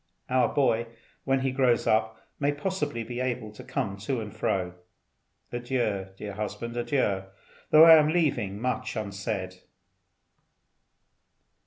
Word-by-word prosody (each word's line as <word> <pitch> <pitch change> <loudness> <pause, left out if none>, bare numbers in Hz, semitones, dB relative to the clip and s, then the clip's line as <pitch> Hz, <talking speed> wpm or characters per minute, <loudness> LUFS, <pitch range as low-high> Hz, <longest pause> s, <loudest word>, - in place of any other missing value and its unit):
Our 130 0 +3
boy, 120 -4 +2 0.4
when 135 -1 +2
he 135 0 0
grows 130 -2 +2
up, 110 0 +1 0.2
may 145 0 +2
possibly 145 -6 -2
be 120 +2 -6
able 120 -4 -2
to 105 - -12
come 100 -1 -3
to 115 +6 -2
and 105 -2 -7
fro. 90 -2 -1 0.8
Adieu, 120 -6 -1
dear 105 0 -6
husband, 105 +3 -5
adieu, 120 -6 0 0.4
though 155 +1 +9
I 165 -1 +10
am 150 0 +3
leaving 145 - 0
much 125 +2 -2
unsaid." 100 -3 -4
115 Hz, 130 wpm, -27 LUFS, 105-130 Hz, 0.8 s, I